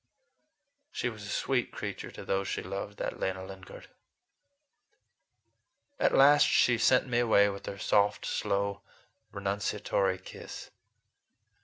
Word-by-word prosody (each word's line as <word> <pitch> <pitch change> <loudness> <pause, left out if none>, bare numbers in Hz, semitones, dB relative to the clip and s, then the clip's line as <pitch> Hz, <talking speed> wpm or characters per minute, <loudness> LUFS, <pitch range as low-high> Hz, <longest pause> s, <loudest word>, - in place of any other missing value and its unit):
She 125 - -2
was 105 -3 -9
a - - -8
sweet 125 +1 0
creature - - -6
to - - -10
those 95 0 -1
she - - -3
loved, 100 +1 -6
that - - -4
Lena 95 0 -2
Lingard! 95 -1 -11 2.1
At - - +3
last 145 +2 +7
she 120 -2 +3
sent 130 - +4
me 125 -2 0
away 105 -4 +4
with 100 0 -7
her 100 - -5
soft, 105 +1 +1
slow, 100 0 -1 0.5
renunciatory 100 -1 -1
kiss. 95 - -10
100 Hz, 125 wpm, -30 LUFS, 100-120 Hz, 2.1 s, last